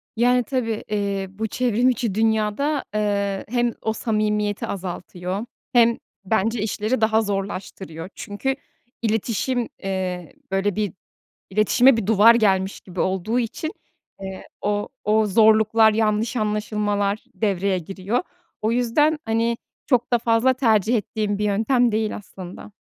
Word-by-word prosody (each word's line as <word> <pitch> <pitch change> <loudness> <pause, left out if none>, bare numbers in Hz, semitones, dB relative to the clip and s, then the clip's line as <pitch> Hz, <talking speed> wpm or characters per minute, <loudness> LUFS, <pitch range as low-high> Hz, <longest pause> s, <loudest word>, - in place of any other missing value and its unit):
Yani, 245 +2 +3
tabii, 230 -4 -2
eee, 200 -2 -1
bu 220 +3 -4
çevrim 245 +1 +2
içi 235 -5 -1
dünyada, 220 +6 +1
eee, 200 -2 0
hem 240 -1 +1
o 220 - -1
samimiyeti 215 0 -1
azaltıyor 185 +2 -5 0.3
hem, 235 -1 +5 0.3
bence, 220 +2 +1
işleri 220 +3 -1
daha 220 0 +3
zorlaştırıyor. 190 -4 -5
Çünkü 235 +5 -3 0.5
iletişim, 230 +2 -1
eee, 185 -3 -3 0.2
böyle, 195 0 0
bir 210 -4 -1 0.6
iletişime 230 +5 +4
bir 205 -3 -2
duvar 225 +2 +7
gelmiş 195 -3 +1
gibi 180 -2 -9
olduğu 190 +6 0
için, 250 +7 -3 0.5
eee, 190 -1 -7
o 205 0 -1
o 215 +1 +3
zorluklar, 220 +1 +5
yanlış 220 +2 +1
anlaşılmalar 210 -1 -1
devreye 195 -3 0
giriyor. 195 +6 -2 0.4
O 220 +2 +1
yüzden, 295 +6 +2
hani, 230 +1 +1 0.3
çok 245 -3 +1
da 240 - +6
fazla 230 +3 +3
tercih 225 -2 +2
ettiğim 210 -1 -2
bir 210 - -2
yöntem 230 +4 +2
değil, 215 0 -1
aslında. 190 0 -10
215 Hz, 130 wpm, -23 LUFS, 200-230 Hz, 0.6 s, duvar